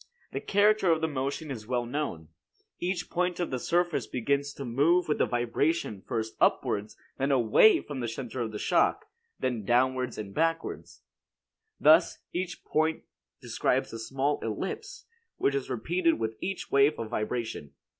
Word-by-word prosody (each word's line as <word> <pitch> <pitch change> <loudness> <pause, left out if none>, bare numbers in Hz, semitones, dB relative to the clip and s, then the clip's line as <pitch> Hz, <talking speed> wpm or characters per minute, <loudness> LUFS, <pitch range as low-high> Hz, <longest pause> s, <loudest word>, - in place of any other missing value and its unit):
The - - -3
character 205 -2 +3
of 160 - +3
the 160 - 0
motion 140 +1 -3
is 110 -5 -7
well 120 -1 0
known. 120 - -4 0.5
Each 175 0 -2
point 180 0 -1
of 175 - -2
the 130 - -1
surface 175 -4 0
begins 140 +3 -1
to 140 - -7
move 150 +9 +3
with 150 - 0
the - - +3
vibration 120 - 0
first 110 -3 -2
upwards, 105 +1 +1 0.2
then 135 +1 +1
away 135 - +5
from 145 -3 -6
the 120 - -2
center 120 +2 -5
of 110 -2 -3
shock, - - +2 0.3
then 120 -4 -1
downward 125 +2 +1
and 100 -2 -6
backwards. 165 +3 -2 0.8
Thus, 160 +3 +5 0.2
each 180 0 -4
point 160 +1 0 0.4
describes - - 0
a 115 - -5
small 135 +5 -1
ellipse, 440 - -5 0.3
which 140 - +1
is 140 -1 -2
repeated 165 +7 +1
with 110 0 -2
each 195 0 -4
wave 140 +2 +4
of 115 -1 -5
vibration. 110 - -3
135 Hz, 155 wpm, -28 LUFS, 115-165 Hz, 0.8 s, away